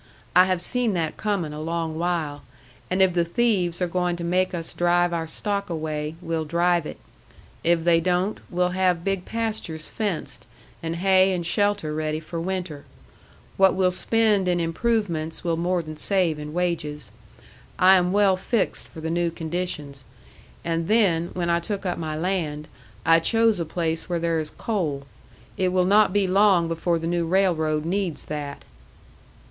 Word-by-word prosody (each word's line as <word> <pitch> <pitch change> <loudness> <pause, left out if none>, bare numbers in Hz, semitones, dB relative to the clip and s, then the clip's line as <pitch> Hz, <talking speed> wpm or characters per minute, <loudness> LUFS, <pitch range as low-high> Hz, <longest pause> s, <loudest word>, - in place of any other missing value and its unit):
"I 180 +1 +8
have 185 -2 -1
seen 245 0 0
that 165 -3 -1
coming 195 -8 -2
a 150 - -6
long 165 0 -2
while. 165 -4 -2 0.5
And 185 +1 +3
if 185 -2 +3
the 170 -1 +2
thieves 180 -2 0
are - - +1
going 180 0 0
to 170 - -6
make 185 +2 +1
us 165 -2 -5
drive 175 0 +2
our 165 -1 -2
stock 200 +4 -2
away, 155 -1 -3
we'll 165 -1 -1
drive 170 +1 +1
it. - - -8 0.7
If 170 -1 +2
they 170 -1 +4
don't, 180 +4 0
we'll 180 0 +1
have 180 -2 +1
big 195 -1 -1
pastures 220 -9 -4
fenced, 205 -7 -4 0.3
and 165 0 -3
hay 190 +1 +4
and 175 -2 -2
shelter 205 -4 0
ready 155 0 -2
for 165 +1 -6
winter. 180 -5 -4 0.7
What 190 -1 +5
we'll 185 -1 +2
spend 210 0 +2
in 175 -1 +2
improvements, 170 -2 -1
we'll 170 -2 0
more 175 +1 0
than 155 -1 -8
save 175 -4 +3
in 150 0 -6
wages. 155 - -2 0.7
I 185 +1 +7
am 180 -1 +2
well 200 -1 +4
fixed 195 +3 -1
for 160 - -11
the 160 +1 -3
new 170 0 +1
conditions. 160 -4 -4 0.6
And 165 0 -1
then, 190 -6 +3
when 170 -1 0
I 170 - +2
took 200 +3 -5
up 180 -2 -2
my 155 -2 -3
land, 155 -3 -2 0.4
I 165 0 +6
chose 225 +3 +2
a 170 - -1
place 165 0 -2
where 175 - 0
there 165 -1 0
is 155 -1 -4
coal. 160 -12 -2 0.5
It 185 - +1
will 180 0 +2
not 205 +1 +5
be 205 0 +2
long 190 -2 +4
before 165 +1 0
the 165 - -5
new 170 0 0
railroad 160 -4 +1
needs 185 -2 -2
that." 145 -2 -6
175 Hz, 175 wpm, -24 LUFS, 165-190 Hz, 0.7 s, I